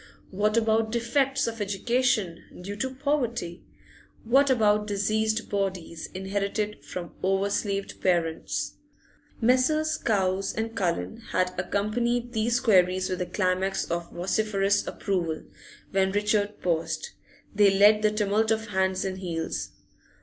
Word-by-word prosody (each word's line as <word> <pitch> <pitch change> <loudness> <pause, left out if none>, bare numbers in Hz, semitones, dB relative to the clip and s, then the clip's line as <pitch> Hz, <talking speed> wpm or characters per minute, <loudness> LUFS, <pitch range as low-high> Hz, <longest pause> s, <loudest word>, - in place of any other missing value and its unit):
What 210 +3 +1
about 220 -1 +2
defects 270 +4 +1
of 230 -1 -4
education, 210 -2 0 0.2
due 200 +3 -5
to 260 +4 -3
poverty? 245 - -1 0.6
What 270 +5 +4
about 210 -4 +3
diseased 215 +2 0
bodies 185 -5 -3
inherited 200 +2 -2
from 175 -2 -6
over 195 +1 +1
slaved 200 -1 -2
parents?' 170 -3 0 0.6
Messrs. 305 +6 +3
Cowes 195 -3 0
and 225 +1 -3
Cullen 185 +3 -1 0.2
had 185 0 +1
accompanied 235 +6 -1
these 235 +2 +1
queries 185 -4 +3
with 185 0 -2
a 180 - -2
climax 185 +1 0
of 170 0 -2
vociferous 200 +2 0
approval; 170 -6 -2 0.5
when 190 0 +2
Richard 210 0 0
paused, 170 - -1 0.4
they 205 -1 +5
led 205 +2 +5
the 215 - +4
tumult 210 +1 +1
of 220 0 0
hands 190 -1 0
and 190 0 -3
heels. 170 -3 -3
205 Hz, 125 wpm, -27 LUFS, 190-225 Hz, 0.6 s, they